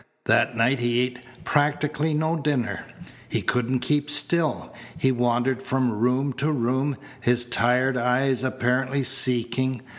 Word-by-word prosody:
That -, -, +2 dB
night 120 Hz, +4 st, +2 dB
he 120 Hz, 0 st, +1 dB
ate 125 Hz, -1 st, -3 dB, 0.2 s
practically 150 Hz, +1 st, 0 dB
no 160 Hz, +2 st, 0 dB
dinner. 145 Hz, -6 st, -2 dB, 0.4 s
He -, -, -2 dB
couldn't 125 Hz, +1 st, 0 dB
keep 145 Hz, +1 st, 0 dB
still. 155 Hz, +2 st, 0 dB, 0.2 s
He 130 Hz, -, +2 dB
wandered 125 Hz, +1 st, 0 dB
from 130 Hz, -2 st, 0 dB
room 125 Hz, +5 st, 0 dB
to 150 Hz, +3 st, +1 dB
room, 130 Hz, +1 st, -1 dB, 0.2 s
his 120 Hz, 0 st, +1 dB
tired 125 Hz, +2 st, +1 dB
eyes 125 Hz, +2 st, +1 dB
apparently 130 Hz, +2 st, 0 dB
seeking. 130 Hz, 0 st, +1 dB
130 Hz, 130 wpm, -24 LUFS, 125-140 Hz, 0.4 s, That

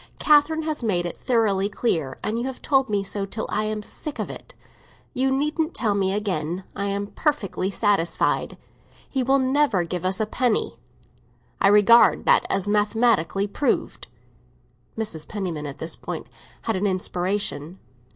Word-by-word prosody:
"Catherine 305 Hz, +2 st, +4 dB
has 310 Hz, -2 st, -3 dB
made 185 Hz, -7 st, 0 dB
it 175 Hz, -, -4 dB
thoroughly 205 Hz, -5 st, +1 dB
clear, 170 Hz, -, -1 dB
and 220 Hz, +2 st, -1 dB
you 240 Hz, -, -2 dB
have 265 Hz, -1 st, -5 dB
told 270 Hz, -3 st, +2 dB
me 205 Hz, -2 st, 0 dB
so 200 Hz, +1 st, -2 dB
till 210 Hz, +3 st, -4 dB
I 215 Hz, -, 0 dB
am 215 Hz, 0 st, -3 dB
sick 300 Hz, +7 st, -5 dB
of -, -, -3 dB
it. -, -, -11 dB, 0.6 s
You 265 Hz, +1 st, +1 dB
needn't 300 Hz, +4 st, 0 dB
tell 215 Hz, -4 st, +1 dB
me 195 Hz, -1 st, +1 dB
again; 185 Hz, -4 st, -2 dB
I 200 Hz, -, -2 dB
am 200 Hz, 0 st, -1 dB
perfectly 205 Hz, -, -1 dB
satisfied. 200 Hz, -4 st, 0 dB, 0.5 s
He 265 Hz, -, -1 dB
will 270 Hz, +2 st, +3 dB
never 260 Hz, -7 st, +2 dB
give 175 Hz, +1 st, -4 dB
us 185 Hz, +1 st, 0 dB
a 215 Hz, -, +1 dB
penny; 240 Hz, +1 st, -1 dB, 0.8 s
I -, -, +5 dB
regard 210 Hz, +3 st, +6 dB
that -, -, +4 dB
as 195 Hz, -, 0 dB
mathematically 210 Hz, -2 st, +2 dB
proved." 240 Hz, +8 st, -1 dB, 0.9 s
Mrs. 165 Hz, -9 st, -3 dB
Penniman 175 Hz, -8 st, -4 dB
at 140 Hz, -, -7 dB
this 160 Hz, -, -4 dB
point -, -, -6 dB, 0.4 s
had 225 Hz, -, -1 dB
an 195 Hz, +2 st, 0 dB
inspiration. 185 Hz, -3 st, -2 dB
205 Hz, 160 wpm, -24 LUFS, 190-250 Hz, 0.9 s, regard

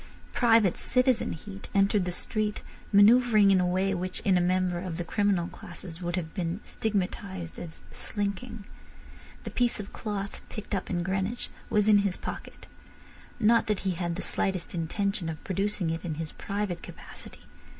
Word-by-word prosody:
Private 225 Hz, -6 st, +4 dB
Citizen 255 Hz, -1 st, +2 dB
Heat 195 Hz, +5 st, -9 dB
entered 195 Hz, -1 st, +4 dB
the 180 Hz, -, -1 dB
street, 210 Hz, +4 st, -1 dB, 0.3 s
manoeuvring 215 Hz, 0 st, +7 dB
in 190 Hz, -1 st, +5 dB
a 180 Hz, -, +2 dB
way 190 Hz, +2 st, +1 dB
which 185 Hz, 0 st, -2 dB
in 195 Hz, -2 st, +3 dB
a 180 Hz, -, +4 dB
member 180 Hz, 0 st, +1 dB
of 175 Hz, -2 st, -4 dB
the 175 Hz, -, -2 dB
criminal 190 Hz, -1 st, +1 dB
classes 175 Hz, -1 st, -8 dB
would 175 Hz, 0 st, -1 dB
have 165 Hz, -3 st, -4 dB
been 175 Hz, -1 st, -2 dB
stigmatised 190 Hz, -4 st, -3 dB
as 165 Hz, -2 st, -9 dB
slinking. 205 Hz, +1 st, -3 dB, 0.8 s
The -, -, -6 dB
piece 245 Hz, -2 st, +1 dB
of 205 Hz, -, -7 dB
cloth 205 Hz, -2 st, -4 dB
picked 215 Hz, 0 st, -7 dB
up 195 Hz, -, -1 dB
in 175 Hz, -2 st, 0 dB
Greenwich 195 Hz, +5 st, -2 dB, 0.2 s
was 210 Hz, 0 st, +3 dB
in 210 Hz, -1 st, +7 dB
his 200 Hz, -2 st, 0 dB
pocket. -, -, -7 dB, 0.7 s
Not 230 Hz, +1 st, +4 dB
that 210 Hz, -2 st, 0 dB
he 190 Hz, -, 0 dB
had 170 Hz, -1 st, -2 dB
the 185 Hz, -, -4 dB
slightest 190 Hz, -3 st, 0 dB
intention 180 Hz, +2 st, -1 dB
of 160 Hz, -, -6 dB
producing 195 Hz, -2 st, -1 dB
it 165 Hz, 0 st, -3 dB
in 165 Hz, -4 st, -3 dB
his 160 Hz, 0 st, -4 dB
private 200 Hz, -3 st, -3 dB
capacity. -, -, -11 dB
195 Hz, 170 wpm, -28 LUFS, 175-210 Hz, 0.8 s, manoeuvring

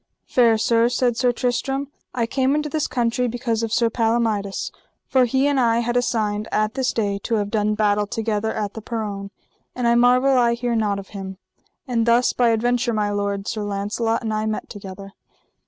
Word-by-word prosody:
Fair 235 Hz, -3 st, +4 dB
sir, 230 Hz, +2 st, +3 dB
said 245 Hz, -1 st, +1 dB
Sir 245 Hz, +1 st, +2 dB
Tristram, 270 Hz, +3 st, -2 dB, 0.2 s
I 235 Hz, -2 st, -1 dB
came 265 Hz, +3 st, +1 dB
into 300 Hz, 0 st, -1 dB
this 310 Hz, 0 st, -1 dB
country 245 Hz, 0 st, 0 dB
because 235 Hz, -1 st, -2 dB
of 225 Hz, -1 st, -2 dB
Sir 230 Hz, 0 st, +2 dB
Palomides; 225 Hz, -4 st, 0 dB, 0.3 s
for 260 Hz, -1 st, +3 dB
he 265 Hz, +3 st, +1 dB
and 285 Hz, -2 st, +2 dB
I 235 Hz, -1 st, +3 dB
had 240 Hz, +1 st, -2 dB
assigned 215 Hz, -3 st, 0 dB
at 215 Hz, +1 st, +1 dB
this 260 Hz, -1 st, 0 dB
day 200 Hz, -3 st, -1 dB
to 230 Hz, +3 st, -2 dB
have 205 Hz, -1 st, -1 dB
done 210 Hz, -1 st, +1 dB
battle 210 Hz, -1 st, +1 dB
together 220 Hz, 0 st, -1 dB
at 205 Hz, -2 st, -3 dB
the 220 Hz, -, -7 dB
peron, 205 Hz, -3 st, -4 dB, 0.5 s
and 245 Hz, -1 st, 0 dB
I 235 Hz, -, +4 dB
marvel 250 Hz, +3 st, +4 dB
I 235 Hz, -1 st, +3 dB
hear 240 Hz, 0 st, -1 dB
not 210 Hz, -3 st, +1 dB
of 195 Hz, -1 st, -8 dB
him. 190 Hz, -2 st, -7 dB, 0.5 s
And 235 Hz, -2 st, 0 dB
thus 235 Hz, +1 st, +4 dB
by 245 Hz, -1 st, +3 dB
adventure 240 Hz, +1 st, +1 dB
my 210 Hz, -1 st, 0 dB
lord, 200 Hz, -1 st, -2 dB
Sir 215 Hz, -, -2 dB
Launcelot, 205 Hz, +3 st, -1 dB
and 220 Hz, -1 st, -2 dB
I 215 Hz, 0 st, -1 dB
met 215 Hz, -, -4 dB
together. 195 Hz, 0 st, -9 dB
230 Hz, 195 wpm, -22 LUFS, 210-245 Hz, 0.5 s, Fair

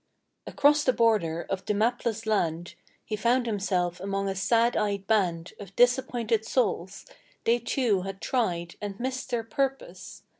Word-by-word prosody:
Across 295 Hz, +1 st, +3 dB
the 255 Hz, -, +4 dB
border 205 Hz, -9 st, +1 dB
of 195 Hz, -1 st, -3 dB
the 210 Hz, -, -1 dB
mapless 230 Hz, 0 st, 0 dB
land 175 Hz, -5 st, -1 dB, 0.3 s
He 215 Hz, -, -3 dB
found 240 Hz, +3 st, +2 dB
himself 190 Hz, -5 st, -1 dB
among 195 Hz, +1 st, -2 dB
a 195 Hz, -, -1 dB
sad 230 Hz, +5 st, +2 dB
eyed 200 Hz, -2 st, -1 dB
band 180 Hz, -6 st, 0 dB
Of 195 Hz, -1 st, -11 dB
disappointed 245 Hz, -3 st, +2 dB
souls; 195 Hz, -6 st, -1 dB, 0.4 s
they, 235 Hz, +1 st, +3 dB
too, 235 Hz, -4 st, +1 dB
had 195 Hz, +1 st, -6 dB
tried 175 Hz, -10 st, -1 dB
And 205 Hz, -1 st, -5 dB
missed 255 Hz, +1 st, -3 dB
their 240 Hz, -3 st, -1 dB
purpose. 270 Hz, +3 st, -4 dB
215 Hz, 150 wpm, -27 LUFS, 195-240 Hz, 0.4 s, the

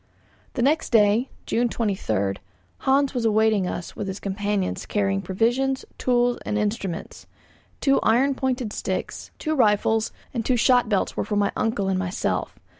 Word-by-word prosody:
The 245 Hz, -, -1 dB
next 300 Hz, +4 st, +2 dB
day, 220 Hz, +2 st, +4 dB, 0.2 s
June 240 Hz, +1 st, +1 dB
23, 115 Hz, -, -1 dB, 0.5 s
Hans 275 Hz, +1 st, +2 dB
was 245 Hz, -3 st, -1 dB
awaiting 220 Hz, -3 st, +3 dB
us 175 Hz, -, -5 dB
with 205 Hz, -, -4 dB
his 190 Hz, +1 st, -4 dB
companions 200 Hz, -1 st, -2 dB
carrying 195 Hz, -1 st, 0 dB
provisions, 240 Hz, +8 st, 0 dB
tools, 245 Hz, -1 st, +2 dB
and 210 Hz, -, -2 dB
instruments; 205 Hz, -5 st, -3 dB, 0.5 s
two 275 Hz, -1 st, +4 dB
iron 255 Hz, +5 st, +3 dB
pointed 255 Hz, -4 st, -2 dB
sticks, -, -, -4 dB
two 310 Hz, -, -2 dB
rifles, 220 Hz, -3 st, +2 dB, 0.2 s
and 235 Hz, -3 st, -2 dB
two 250 Hz, +2 st, +1 dB
shot 245 Hz, -1 st, +4 dB
belts 200 Hz, -3 st, 0 dB
were -, -, -1 dB
for 210 Hz, 0 st, -3 dB
my 205 Hz, -1 st, +2 dB
uncle 215 Hz, -3 st, 0 dB
and 190 Hz, -1 st, +1 dB
myself. 185 Hz, 0 st, -2 dB
220 Hz, 155 wpm, -24 LUFS, 200-245 Hz, 0.5 s, day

